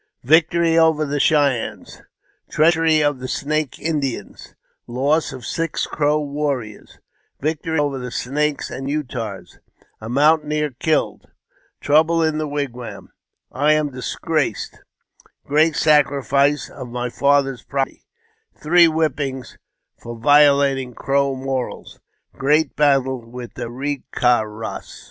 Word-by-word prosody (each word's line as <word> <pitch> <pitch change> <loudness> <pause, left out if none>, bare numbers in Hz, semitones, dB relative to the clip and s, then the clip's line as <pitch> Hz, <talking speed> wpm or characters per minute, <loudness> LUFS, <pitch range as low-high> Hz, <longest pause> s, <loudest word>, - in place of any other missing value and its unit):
Tictory 165 +3 +4
over 160 -2 +3
the 145 0 -2
Cheyennea 140 -6 +1 0.4
— - - -42
Treachery 160 -1 +3
of 145 -3 0
the 130 - -5
Snake 150 +1 -2
Indians 145 -6 -4 0.2
— - - -50
Loss 150 +3 +1
of 130 -3 -9
six 165 0 -2
Crow 150 0 0
Warriors 140 -7 -4 0.2
— - - -46
Victory 160 +2 -2
over 145 -2 0
the 125 0 -6
Snakes 145 +5 -2
and 135 +2 -5
Utahs—A 115 -5 -7
Mountaineer 150 +2 +2
killed 160 -1 -1 0.2
— - - -40
Trouble 160 +3 +3
in 155 -1 0
the 155 - -2
Wigwam 140 -5 -5 0.3
— - - -59 0.2
I 155 - +6
am 155 -1 0
disgraced 135 0 -3 0.3
— - - -32
Great 155 +2 +2
Sacrifice 145 -1 +2
of 130 -3 -9
my 120 0 -4
Father's 140 -2 +1
Property 135 -1 -4 0.3
— 450 0 -46
Three 170 +3 +5
Whippings 145 -5 -2 0.4
for 120 0 -8
violating 140 -1 +3
Crow 140 0 0
Morals 130 -1 -5 0.2
— - - -53
Great 150 +2 +1
Battle 135 -4 +2
with 120 +1 -9
the 120 -1 -5
Ke 135 +2 -5
ka 125 -2 +3
ras. 110 +1 -7
145 Hz, 135 wpm, -20 LUFS, 130-155 Hz, 0.4 s, I